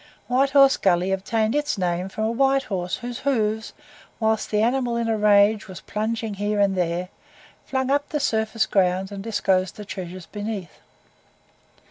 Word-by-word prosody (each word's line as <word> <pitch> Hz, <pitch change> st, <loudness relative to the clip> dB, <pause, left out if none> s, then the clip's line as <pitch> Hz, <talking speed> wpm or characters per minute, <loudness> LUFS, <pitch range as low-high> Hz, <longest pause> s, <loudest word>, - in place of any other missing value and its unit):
White 255 Hz, +5 st, +2 dB
Horse 275 Hz, -1 st, +6 dB
Gully 185 Hz, 0 st, +2 dB
obtained 215 Hz, +4 st, 0 dB
its 295 Hz, -5 st, 0 dB
name 180 Hz, 0 st, -1 dB
from 215 Hz, -, -4 dB
a 220 Hz, -, +1 dB
white 270 Hz, +2 st, +2 dB
horse 180 Hz, -5 st, -3 dB
whose 245 Hz, 0 st, -6 dB
hoofs, 220 Hz, -5 st, 0 dB, 0.5 s
whilst 220 Hz, -1 st, 0 dB
the 210 Hz, 0 st, +1 dB
animal 245 Hz, 0 st, +1 dB
in 235 Hz, -1 st, -1 dB
a 225 Hz, -, +1 dB
rage 210 Hz, 0 st, +4 dB
was 185 Hz, -2 st, -9 dB
plunging 220 Hz, +1 st, -3 dB
here 205 Hz, +1 st, -1 dB
and 200 Hz, -1 st, +3 dB
there, 180 Hz, 0 st, -1 dB, 0.6 s
flung 265 Hz, 0 st, -1 dB
up 285 Hz, +1 st, +1 dB
the 300 Hz, -, -1 dB
surface 220 Hz, -3 st, 0 dB
ground 190 Hz, 0 st, +1 dB
and 195 Hz, -1 st, -6 dB
disclosed 190 Hz, -4 st, 0 dB
the 210 Hz, -, -8 dB
treasures 185 Hz, -2 st, -7 dB
beneath. 205 Hz, -5 st, -6 dB
215 Hz, 165 wpm, -23 LUFS, 190-235 Hz, 0.6 s, Horse